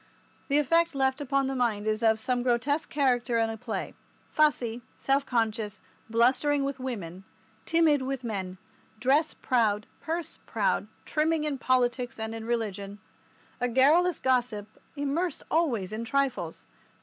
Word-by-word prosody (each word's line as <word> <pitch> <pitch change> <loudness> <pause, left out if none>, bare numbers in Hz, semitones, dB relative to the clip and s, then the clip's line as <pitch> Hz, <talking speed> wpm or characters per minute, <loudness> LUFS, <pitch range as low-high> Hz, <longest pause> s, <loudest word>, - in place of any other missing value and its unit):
The 280 - +3
effect 330 +2 +3
left 265 +1 +1
upon 275 0 +1
the 270 - -1
mind 230 -5 0
is 215 +1 0
of 220 -1 +3
some 245 +2 0
grotesque 255 +5 0
character 250 -4 +1
in 225 0 +1
a - - -5
play, 220 - -4 0.4
fussy, 245 -6 +2
self 275 +1 +1
conscious, 220 -3 -1 0.3
blustering 260 +5 +3
with 275 -1 -3
women, 195 -8 -5 0.4
timid 325 -4 +4
with 265 -1 -3
men, 190 -5 -4 0.4
dress 280 +7 +2
proud, 215 -5 +1 0.2
purse 330 +1 -4
proud, - - 0 0.2
trimming 310 0 +1
in 295 -3 -2
politics 250 -1 +1
and 220 0 -3
in 225 0 -6
religion, 205 -4 -3 0.6
a 245 - +1
garrulous 300 +8 +4
gossip 245 -5 0 0.3
immersed 285 +4 -1
always 235 - +1
in 220 +2 -3
trifles. 275 +2 -1
255 Hz, 140 wpm, -28 LUFS, 225-285 Hz, 0.6 s, timid